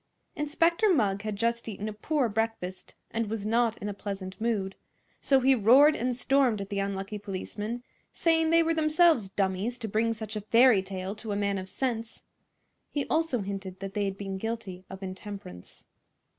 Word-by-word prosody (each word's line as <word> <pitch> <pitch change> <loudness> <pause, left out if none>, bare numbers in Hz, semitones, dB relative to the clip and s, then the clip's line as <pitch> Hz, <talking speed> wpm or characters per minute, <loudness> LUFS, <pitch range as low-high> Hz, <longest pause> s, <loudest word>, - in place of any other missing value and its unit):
Inspector 335 +7 +2
Mugg 205 - +2
had 215 -1 -3
just 235 +2 -1
eaten 210 0 -5
a 215 - -4
poor 270 +5 0
breakfast, 220 -4 -3 0.2
and 230 -2 -1
was 215 -2 -3
not 230 +1 +2
in 205 - -5
a 205 - -3
pleasant 195 -1 -6
mood; 205 -5 0 0.5
so 270 -1 +3
he 265 +1 +5
roared 260 +7 +6
and 250 +1 -1
stormed 255 -3 +2
at 195 0 -5
the 200 -1 -2
unlucky 195 +1 -3
policemen, 210 +4 -5 0.3
saying 325 -1 +2
they 330 0 +5
were 330 0 +1
themselves 310 - +3
dummies 195 +5 -1
to 235 -2 -5
bring 225 +2 +1
such 220 0 -6
a 210 - -2
fairy 230 0 +5
tale 190 0 -5
to 220 0 -7
a - - 0
man 200 -1 0
of 190 0 -7
sense. 230 -1 -3 0.7
He 285 -2 -2
also 315 -7 +1
hinted 195 -1 -5
that 195 0 -6
they 205 -1 0
had 195 0 -3
been 195 -1 -5
guilty 220 -4 -5
of 190 0 -8
intemperance. 190 - -9
215 Hz, 185 wpm, -28 LUFS, 195-245 Hz, 0.7 s, roared